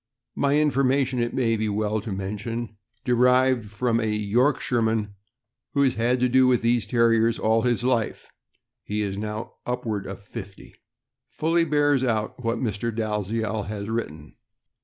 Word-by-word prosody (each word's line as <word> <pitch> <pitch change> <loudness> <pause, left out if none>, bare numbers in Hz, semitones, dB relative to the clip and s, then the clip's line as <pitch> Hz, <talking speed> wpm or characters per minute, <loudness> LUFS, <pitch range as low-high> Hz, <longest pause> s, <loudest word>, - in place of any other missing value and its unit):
My 140 +1 +2
information, 135 -3 +2
it 120 0 -1
may 115 -3 +2
be 110 -1 -1
well 105 +1 -1
to 110 - -6
mention, 105 +4 -4 0.3
derived 125 -1 +3
from 115 +2 0
a 110 -1 0
Yorkshireman 110 -1 +1 0.6
who 140 - +4
has 130 - +3
had 120 +3 +1
to 125 - +4
do 130 +1 +4
with 125 -2 +2
these 115 -2 +2
Terriers 115 0 +3
all 110 +1 +2
his 120 -1 0
life 120 -3 0 0.6
(he 105 +1 -2
is 100 -2 -2
now 105 +2 -5
upward 115 -5 -3
of 95 0 -7
fifty), 100 -1 -10 0.6
fully 165 +2 +1
bears 145 -3 +2
out 115 0 -1
what 115 +1 0
Mr. 115 -1 -2
Dalziel 110 0 -2
has 105 0 -5
written. 80 -10 -5
115 Hz, 150 wpm, -25 LUFS, 105-125 Hz, 0.6 s, who